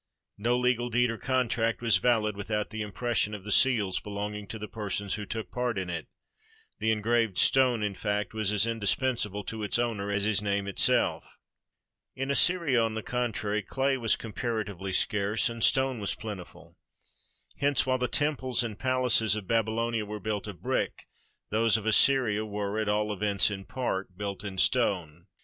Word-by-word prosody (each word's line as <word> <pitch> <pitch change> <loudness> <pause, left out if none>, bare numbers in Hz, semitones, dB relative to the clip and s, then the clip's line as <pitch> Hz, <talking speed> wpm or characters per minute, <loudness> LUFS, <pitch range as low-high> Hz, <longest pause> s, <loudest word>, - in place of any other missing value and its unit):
No 120 +3 +1
legal 125 -1 +1
deed 120 0 +2
or 115 - -6
contract 120 -3 0
was 115 -5 +4
valid 105 0 +1
without 105 +1 -3
the 110 -1 -4
impression 105 0 -1
of 100 - -9
the 105 - -4
seals 110 -6 +4
belonging 105 0 -5
to 110 - -6
the 105 0 -6
persons 100 -2 -3
who 105 -2 -4
took 110 +1 -5
part 125 -3 -2
in 95 -2 -3
it; 85 -2 -5 0.7
the 110 - +1
engraved 110 -1 +1
stone, 125 -4 +4
in 105 -1 -1
fact, 105 +1 -2
was 110 -2 0
as 105 0 +3
indispensable 115 -1 0
to 110 +1 -6
its 105 - 0
owner 115 -4 -1
as 100 0 0
his 105 -1 +2
name 100 -1 -1
itself. 100 - +1 0.8
In 135 +1 -2
Assyria, 150 -5 +3
on 115 -1 0
the 110 - -4
contrary, 110 -4 -2
clay 135 +7 0
was 115 -4 +2
comparatively 105 -4 -4
scarce, 105 +4 +1
and 115 -1 -4
stone 130 -2 +3
was 100 - -2
plentiful. 105 -5 -9 0.8
Hence, 140 -3 +3
while 130 0 +1
the 125 - 0
tem 145 +2 0
ples 125 -2 0
and 110 -3 -5
palaces 125 -5 +2
of 105 -2 -5
Babylonia 115 +1 0
were 105 0 -6
built 105 +1 -3
of 100 -4 -9
brick, - - -2 0.5
those 115 +1 +3
of 110 - -7
Assyria 110 -2 +4
were, 105 0 -3
at 110 -1 -1
all 105 0 0
events 100 0 +1
in 95 -1 -6
part, 95 -8 -3
built 100 -1 -5
of 95 -2 -5
stone. 90 -10 +1
110 Hz, 175 wpm, -28 LUFS, 100-120 Hz, 0.8 s, was